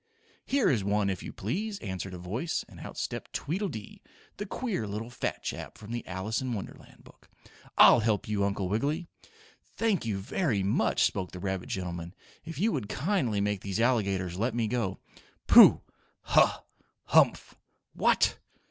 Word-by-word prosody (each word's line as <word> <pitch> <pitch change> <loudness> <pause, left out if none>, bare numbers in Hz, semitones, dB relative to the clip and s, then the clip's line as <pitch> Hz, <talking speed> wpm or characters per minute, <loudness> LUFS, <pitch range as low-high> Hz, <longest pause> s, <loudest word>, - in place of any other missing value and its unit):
"Here 275 -3 +2
is 115 -8 +2
one, 100 0 +1
if 95 - -5
you - - -7
please," 200 - -3
answered 95 - -5
a - - -6
voice, 105 - -3
and - - -14
out - - -9
stepped - - -5
Tweedledee, 160 - -4 0.4
the 205 - -5
queer 200 - -3
little 110 +4 -5
fat 120 - -3
chap - - -5
from 105 +1 -10
the 120 0 -3
Alice 95 +6 -2
in 130 -2 -2
Wonderland 100 -4 -9
book. - - -20 0.5
"I'll - - +8
help 110 -2 0
you, 105 -2 0
Uncle 100 -1 -1
Wiggily." 145 - -1 0.7
"Thank 225 -5 +1
you, 110 -4 -2
very 105 - -1
much," 100 - +2
spoke 95 -2 -1
the 90 - -7
rabbit 95 -1 -3
gentleman. 85 -1 -4 0.3
"If 165 - -8
you 215 +6 +2
would 120 - -3
kindly 130 - 0
make 100 -1 -1
these 100 +1 -3
alligators 100 -7 +1
let 115 +2 0
me 115 -2 0
go 110 -5 -1 0.3
" - - -32
"Pooh! - - +9 0.4
Huh! - - +3 0.4
Humph! - - +3 0.4
What! - - +2
105 Hz, 165 wpm, -29 LUFS, 95-130 Hz, 0.7 s, Pooh